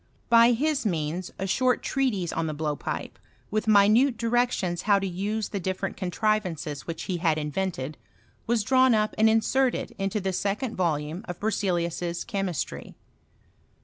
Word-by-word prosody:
By 235 +1 +7
his 290 +3 0
means 170 -2 -2
a - - -4
^tort 250 +6 +1
treatise 215 -11 0
on 165 0 -1
the 155 - -3
blowpipe, 150 -1 -4 0.3
with 215 +1 -1
minute 215 +5 +5
di 235 - -4
rections 230 -7 0
huw 200 -1 +4
to 195 - -3
use 200 +4 -2
the 200 - -3
diSereat 190 +2 -3
contrivances 185 -6 -2
which 165 -1 -5
lie 185 - -1
had 165 -2 +1
invented, 155 -2 -3 0.5
was 230 -2 +2
drawn 260 +1 +4
up 215 0 +1
and 220 0 +6
inserted 245 +4 +1
in 195 0 0
the 190 -2 -2
second 210 +6 -2
volume 160 0 -1
of 175 - -6
Berzeliua's 175 -5 -1
Chemistry. 195 -7 -4
195 Hz, 150 wpm, -26 LUFS, 175-225 Hz, 0.5 s, By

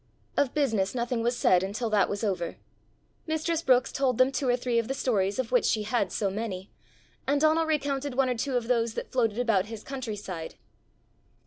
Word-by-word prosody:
Of 280 -3 +1
business 225 -9 +1
nothing 240 -1 -1
was 240 +1 0
said 180 -5 +4
until 210 +4 -3
that 210 -2 +3
was 205 +2 -3
over. 180 -5 -2 0.7
Mistress 315 +1 0
Brookes 255 -4 +3
told 260 -4 +1
them 255 +1 +4
two 275 -1 -1
or 245 - +3
three 245 -1 0
of 230 - -2
the 270 - -2
stories 200 -7 0
of 250 -3 -2
which 250 - +4
she 215 - +1
had 210 -3 0
so 200 -2 -1
many, 195 -2 -5 0.6
and 285 +1 +2
Donal 315 +2 +3
recounted 285 -3 -1
one 265 0 +3
or 250 - 0
two 255 +2 -1
of 235 -2 -3
those 235 -2 +1
that - - -5
floated 230 -4 +1
about 225 -6 +2
his 220 -1 -8
country 260 -5 -5
side. 185 -5 -6
240 Hz, 205 wpm, -28 LUFS, 210-270 Hz, 0.7 s, said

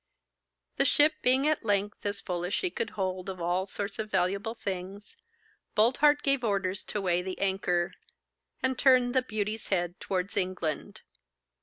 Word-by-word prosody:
The - - +4
ship 295 +3 +5
being 260 +3 +3
at 310 -3 +1
length 205 -1 0
as 205 0 -2
full 175 -2 -3
as 180 +3 -1
she 370 - -1
could 225 - -3
hold 185 -1 -2
of 185 -1 -6
all 175 +3 0
sorts 200 +1 -4
of 215 0 -3
valuable 195 +4 0
things, 195 -1 -6 0.6
Boldheart 280 +7 +4
gave 275 -2 +1
orders 195 -3 0
to 210 - -3
weigh 180 -2 +1
the 185 0 -5
anchor, 185 -3 0 0.7
and 260 -1 0
turn 255 -2 +5
'The 260 0 +3
Beauty's' 215 -2 -3
head 175 -2 -1
towards 185 0 -2
England. 180 -4 -2
200 Hz, 160 wpm, -29 LUFS, 185-240 Hz, 0.7 s, ship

